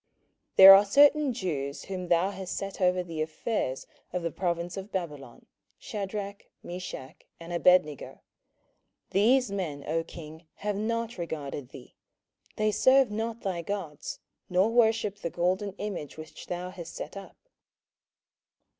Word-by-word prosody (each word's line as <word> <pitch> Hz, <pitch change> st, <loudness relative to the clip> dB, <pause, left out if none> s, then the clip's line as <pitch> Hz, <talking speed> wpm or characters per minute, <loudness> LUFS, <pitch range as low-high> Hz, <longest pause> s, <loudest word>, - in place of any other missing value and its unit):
27:003:012 -, -, -51 dB
There 195 Hz, 0 st, +12 dB
are 195 Hz, +1 st, +7 dB
certain 285 Hz, +5 st, +5 dB
Jews 145 Hz, -8 st, -3 dB
whom 185 Hz, -2 st, -5 dB
thou 175 Hz, +3 st, +2 dB
hast 190 Hz, -2 st, -5 dB
set 195 Hz, 0 st, -5 dB
over 180 Hz, 0 st, +3 dB
the 165 Hz, -3 st, -5 dB
affairs 155 Hz, -, -2 dB, 0.3 s
of 180 Hz, -1 st, -3 dB
the 170 Hz, -, -1 dB
province 175 Hz, 0 st, -2 dB
of 195 Hz, +1 st, -7 dB
Babylon, 150 Hz, -9 st, -6 dB, 0.3 s
Shadrach, 200 Hz, 0 st, -5 dB, 0.2 s
Meshach, 175 Hz, -7 st, -7 dB, 0.2 s
and 170 Hz, +1 st, -8 dB
Abednego; 170 Hz, -5 st, +2 dB, 0.9 s
these 235 Hz, +4 st, +3 dB
men, 160 Hz, -8 st, -4 dB
O 165 Hz, +2 st, 0 dB
king, 160 Hz, 0 st, -11 dB
have 210 Hz, 0 st, -3 dB
not 230 Hz, +1 st, -2 dB
regarded 145 Hz, -5 st, -5 dB
thee: 125 Hz, -, -13 dB, 0.6 s
they 215 Hz, 0 st, +1 dB
serve 260 Hz, +2 st, +4 dB
not 225 Hz, +2 st, -3 dB
thy 185 Hz, -3 st, -2 dB
gods, 170 Hz, -5 st, -5 dB, 0.3 s
nor 185 Hz, +4 st, +3 dB
worship 225 Hz, -3 st, +2 dB
the 170 Hz, -, -4 dB
golden 185 Hz, +4 st, -1 dB
image 195 Hz, -9 st, -6 dB
which 155 Hz, 0 st, -10 dB
thou 180 Hz, +1 st, -4 dB
hast 175 Hz, -3 st, -9 dB
set -, -, -7 dB
up. 195 Hz, 0 st, -10 dB
185 Hz, 140 wpm, -28 LUFS, 165-205 Hz, 0.9 s, There